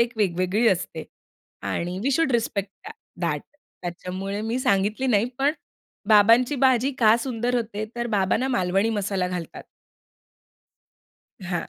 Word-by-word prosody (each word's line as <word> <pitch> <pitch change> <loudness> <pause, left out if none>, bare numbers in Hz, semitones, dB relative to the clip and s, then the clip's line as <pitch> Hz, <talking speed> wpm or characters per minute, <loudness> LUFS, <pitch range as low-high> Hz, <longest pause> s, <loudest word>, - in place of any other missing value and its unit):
एक 235 0 +2
वेगवेगळी 190 +3 +1
असते 170 -4 -2 0.7
आणि 175 +2 -3
वी 275 - +1
शुल्ड 305 -1 +2
रिस्पेक्ट 205 -4 -1 0.2
दया 440 +1 -6
दयाट. - - -2 0.4
त्याच्यामुळे 185 +3 -5
मी 230 +3 -2
सांगितली 210 +2 +1
नाही 220 -3 +3
पण 280 +2 +3 0.6
बाबांची 230 +6 +5
भाजी 260 0 +3
का 220 -1 +6
सुंदर 245 -1 -2
होते 220 -3 -2
तर 240 0 -2
बाबा 195 -4 +1
ना 260 +3 -1
मालवणी 195 -2 +1
मसाला 195 -4 -1
घालतात. 180 -2 -6 1.8
हां. 175 -2 -3
215 Hz, 135 wpm, -24 LUFS, 190-245 Hz, 1.8 s, का